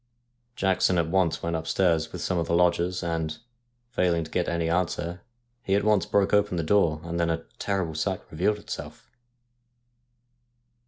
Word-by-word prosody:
Jackson 95 Hz, -4 st, +2 dB
at 80 Hz, -1 st, 0 dB
once 90 Hz, -4 st, +1 dB
went 85 Hz, 0 st, -1 dB
upstairs 80 Hz, 0 st, +1 dB
with -, -, -6 dB
some 90 Hz, -2 st, 0 dB
of 85 Hz, -, -1 dB
the 85 Hz, -, +1 dB
lodgers, 90 Hz, +1 st, +2 dB
and, 80 Hz, -2 st, -2 dB, 0.5 s
failing 85 Hz, -7 st, +1 dB
to 80 Hz, -, -11 dB
get 90 Hz, -, 0 dB
any 85 Hz, -1 st, -1 dB
answer, 85 Hz, 0 st, -1 dB, 0.4 s
he 95 Hz, -, +1 dB
at 100 Hz, -, +2 dB
once 105 Hz, -2 st, +3 dB
broke 100 Hz, 0 st, +2 dB
open 105 Hz, -3 st, +3 dB
the 85 Hz, -, 0 dB
door, 80 Hz, -3 st, +3 dB
and 85 Hz, 0 st, -3 dB
then 85 Hz, 0 st, +1 dB
a 80 Hz, 0 st, -1 dB, 0.2 s
terrible 95 Hz, -5 st, -1 dB
sight 90 Hz, +4 st, -1 dB
revealed 95 Hz, +7 st, +1 dB
itself. -, -, -8 dB
85 Hz, 165 wpm, -26 LUFS, 85-95 Hz, 0.5 s, once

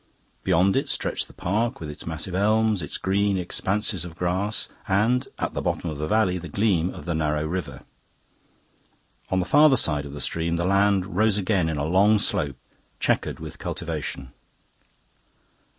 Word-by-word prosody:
Beyond 95 Hz, +1 st, +3 dB
it -, -, 0 dB
stretched -, -, -1 dB
the -, -, -16 dB
park, 115 Hz, +7 st, -1 dB
with 80 Hz, -, -6 dB
its 75 Hz, +2 st, -9 dB
massive 80 Hz, +3 st, -3 dB
elms, 110 Hz, +1 st, +2 dB
its 75 Hz, -, -4 dB
green 100 Hz, +1 st, +1 dB
expanses 95 Hz, +1 st, 0 dB
of 85 Hz, -2 st, -8 dB
grass, 95 Hz, +5 st, -1 dB, 0.2 s
and, 110 Hz, +6 st, +2 dB
at -, -, -2 dB
the -, -, -2 dB
bottom 85 Hz, -, -2 dB
of 75 Hz, -, -7 dB
the 75 Hz, -, -2 dB
valley, 95 Hz, -2 st, +2 dB
the 85 Hz, -1 st, -8 dB
gleam 95 Hz, -2 st, +1 dB
of -, -, -10 dB
the 85 Hz, -, -1 dB
narrow 75 Hz, -1 st, 0 dB
river. 90 Hz, +3 st, -4 dB, 1.5 s
On 95 Hz, -, +1 dB
the 90 Hz, -, 0 dB
farther 145 Hz, -, +6 dB
side 75 Hz, -2 st, +2 dB
of 70 Hz, -, -8 dB
the 75 Hz, -, -6 dB
stream 85 Hz, +2 st, -1 dB
the 85 Hz, +1 st, -1 dB
land 100 Hz, -1 st, +2 dB
rose 105 Hz, 0 st, +3 dB
again 95 Hz, -4 st, +1 dB
in 80 Hz, -, -2 dB
a 70 Hz, -, -1 dB
long 100 Hz, +6 st, +4 dB
slope, 70 Hz, -9 st, -1 dB, 0.4 s
chequered -, -, 0 dB
with -, -, -8 dB
cultivation. 65 Hz, -2 st, -5 dB
95 Hz, 170 wpm, -25 LUFS, 80-105 Hz, 1.5 s, farther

